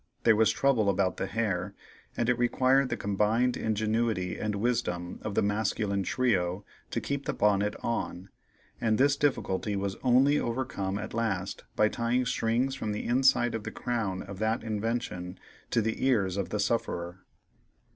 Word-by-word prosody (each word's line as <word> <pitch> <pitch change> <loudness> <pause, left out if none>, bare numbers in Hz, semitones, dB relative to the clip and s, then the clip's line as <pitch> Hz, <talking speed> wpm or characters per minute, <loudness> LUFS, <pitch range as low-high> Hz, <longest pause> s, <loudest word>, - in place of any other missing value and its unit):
There 115 - +6
was 110 0 +4
trouble 115 -3 +2
about 95 -1 +1
the - - -2
hair, 100 -4 -2 0.4
and 120 - +1
it 125 -1 +2
required 130 +2 +3
the - - -2
combined 105 +5 +1
ingenuity 110 -3 0
and 105 -1 -2
wisdom 100 -6 -1
of 105 - -4
the - - +3
masculine 105 -1 0
trio 95 -4 0 0.2
to - - -1
keep 140 -1 -3
the - - -1
bonnet 105 0 +2
on, 100 -5 -3 0.5
and 110 -2 +2
this 140 +2 +4
difficulty 110 -8 0
was 100 0 -2
only 135 +3 +4
overcome 115 -5 -2
at 105 +1 -6
last 100 -4 -2
by 105 - +4
tying 120 +3 0
strings 120 +2 0
from 110 -6 -3
the 105 - -4
inside 125 -1 +3
of 115 - -3
the - - -4
crown 110 -7 -2
of 100 -1 -9
that 110 +1 0
invention 105 -4 -3 0.3
to 115 - +2
the 110 +1 -2
ears 105 -8 +2
of 100 -3 -2
the 105 - -2
sufferer. 95 -5 -1
110 Hz, 165 wpm, -29 LUFS, 100-120 Hz, 0.5 s, There